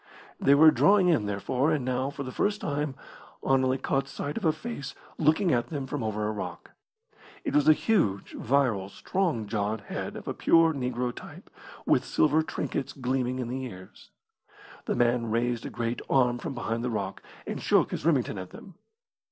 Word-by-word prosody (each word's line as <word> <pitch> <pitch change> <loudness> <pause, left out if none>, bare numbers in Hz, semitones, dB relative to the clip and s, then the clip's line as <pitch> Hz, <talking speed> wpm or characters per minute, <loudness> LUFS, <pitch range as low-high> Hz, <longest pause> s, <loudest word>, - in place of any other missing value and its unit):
They 140 - +5
were 155 +2 +8
drawing 195 0 +4
in, 120 -12 +2
therefore, 125 +8 0
and 145 -5 0
now, 130 +1 0
for 140 0 -6
the 130 - -6
first 205 +9 0
time, 145 -1 -2 0.5
Anerley 130 -1 +3
caught 135 0 -1
sight 145 +1 -5
of 225 - -3
a 160 - +5
face 155 - -6 0.2
looking 160 +4 +3
at 120 -1 +1
them 145 -4 -4
from 140 +1 -4
over 105 -1 -2
a - - -1
rock. 105 - -6 0.7
It - - -2
was 150 0 +3
a - - +9
huge, 150 - 0
virile, 120 -7 +1
strong 165 - -1
jawed 105 0 -2
head - - -5
of - - -9
a - - -1
pure 165 -1 +4
negro 125 -2 -2
type, - - -12 0.3
with - - +3
silver 155 +1 +2
trinkets 145 -3 -3
gleaming 130 -1 -1
in 125 -2 -3
the 130 +2 -3
ears. 95 -7 -10 0.8
The - - -1
man 120 -1 +2
raised 115 +1 0
a - - -6
great 120 0 -3
arm 125 -2 +3
from 135 - -5
behind 115 -1 -2
the 125 - -1
rock, 100 -4 -3 0.2
and - - -4
shook - - +3
his - - -4
Remington 135 - +1
at 95 - -7
them. 190 - -12
130 Hz, 185 wpm, -28 LUFS, 115-150 Hz, 0.8 s, a